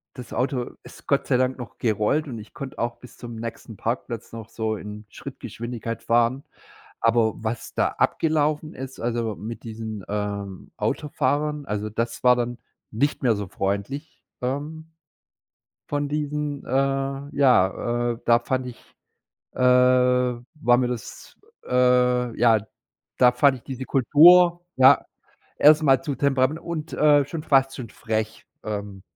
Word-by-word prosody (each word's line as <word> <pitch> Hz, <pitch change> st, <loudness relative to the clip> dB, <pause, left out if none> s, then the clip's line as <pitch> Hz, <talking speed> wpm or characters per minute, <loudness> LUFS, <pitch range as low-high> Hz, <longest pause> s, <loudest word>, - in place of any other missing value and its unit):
Das 125 Hz, -2 st, -9 dB
Auto, 125 Hz, -1 st, -1 dB
ist -, -, -14 dB
Gott -, -, +1 dB
sei 125 Hz, -, +3 dB
Dank 130 Hz, +1 st, 0 dB
noch 125 Hz, -, -9 dB
gerollt 115 Hz, +7 st, 0 dB
und 120 Hz, -5 st, -6 dB
ich 105 Hz, -, -13 dB
konnte 135 Hz, -2 st, -8 dB
auch 120 Hz, 0 st, -2 dB
bis 125 Hz, -, -15 dB
zum 120 Hz, -1 st, -8 dB
nächsten 115 Hz, -1 st, -7 dB
Parkplatz 115 Hz, +1 st, -4 dB
noch 115 Hz, -1 st, -8 dB
so 110 Hz, -1 st, -2 dB
in 105 Hz, +1 st, -9 dB
Schrittgeschwindigkeit 115 Hz, -1 st, -7 dB
fahren. 120 Hz, +3 st, +2 dB, 0.6 s
Aber, 115 Hz, -1 st, +3 dB
was 110 Hz, +1 st, -4 dB
da -, -, +2 dB
abgelaufen 155 Hz, -1 st, +1 dB
ist, 130 Hz, 0 st, -8 dB
also, 115 Hz, -3 st, -2 dB
mit 115 Hz, +2 st, -8 dB
diesen, 110 Hz, -3 st, -6 dB
ähm, 100 Hz, -2 st, -4 dB
Autofahrern, 150 Hz, 0 st, -1 dB
also, 105 Hz, -2 st, -3 dB
das 115 Hz, +2 st, -3 dB
war 125 Hz, 0 st, +6 dB
dann 120 Hz, 0 st, -2 dB, 0.3 s
nicht 140 Hz, +7 st, -1 dB
mehr 120 Hz, -5 st, +3 dB
so 100 Hz, -1 st, -5 dB
freundlich, 100 Hz, -, -4 dB, 0.2 s
ähm, 150 Hz, +5 st, -4 dB, 1.0 s
von 145 Hz, 0 st, -1 dB
diesen, 150 Hz, -1 st, -3 dB
äh, -, -, -9 dB, 0.7 s
ja, 120 Hz, -2 st, +2 dB
äh 115 Hz, -, -8 dB
da 120 Hz, 0 st, +5 dB
fand 130 Hz, +2 st, -2 dB
ich, 125 Hz, -, -9 dB, 0.8 s
äh, -, -, -11 dB
war 125 Hz, 0 st, +3 dB
mir 125 Hz, -, +1 dB
das, 120 Hz, -3 st, -7 dB, 0.3 s
äh, 125 Hz, -1 st, +2 dB
ja 115 Hz, -2 st, +5 dB, 0.6 s
da 125 Hz, -1 st, +6 dB
fand 130 Hz, +2 st, +3 dB
ich -, -, -21 dB
diese 130 Hz, -1 st, -6 dB
Kultur, 170 Hz, +7 st, +6 dB
ja, 130 Hz, +1 st, +6 dB, 0.5 s
erstmal 150 Hz, -2 st, +5 dB
zu 150 Hz, -4 st, -3 dB
temperament 140 Hz, +3 st, +1 dB
und, 165 Hz, -2 st, -5 dB
äh, 145 Hz, -2 st, +4 dB
schon 155 Hz, +3 st, -6 dB
fast 135 Hz, -2 st, +3 dB
zu 130 Hz, -2 st, -7 dB
frech. 110 Hz, -1 st, -4 dB, 0.2 s
Ähm, 100 Hz, -2 st, -5 dB
125 Hz, 145 wpm, -24 LUFS, 115-140 Hz, 1.0 s, war